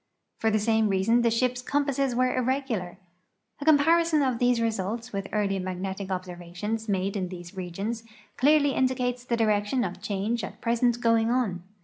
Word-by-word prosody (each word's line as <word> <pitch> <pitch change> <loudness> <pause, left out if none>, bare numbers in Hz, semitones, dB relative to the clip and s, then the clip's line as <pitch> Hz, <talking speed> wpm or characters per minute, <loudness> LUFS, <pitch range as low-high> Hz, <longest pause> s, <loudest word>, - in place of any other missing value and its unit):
For 225 - +2
the 215 - +2
same 220 0 +2
reason 195 +5 +3
the 235 - +3
ship's 245 +2 0
compasses 275 -1 0
were 255 0 +2
irregular. 255 -8 -1 0.6
A 285 - -6
comparison 315 +1 +4
of 255 -3 0
these 245 -1 +3
results 225 +1 -2
with 195 -1 -3
earlier 200 -2 0
magnetic 190 +1 -4
observations 185 +4 -4
made 195 0 0
in 190 -2 -1
these 175 0 -9
regions 195 +5 -4 0.3
clearly 285 +1 +4
indicates 250 -2 0
the 240 -1 -1
direction 215 +2 +1
of 185 -1 -5
change 210 +2 -2
at - - -7
present 240 0 +1
going 230 -1 +3
on. 230 -8 0
225 Hz, 160 wpm, -27 LUFS, 195-250 Hz, 0.6 s, comparison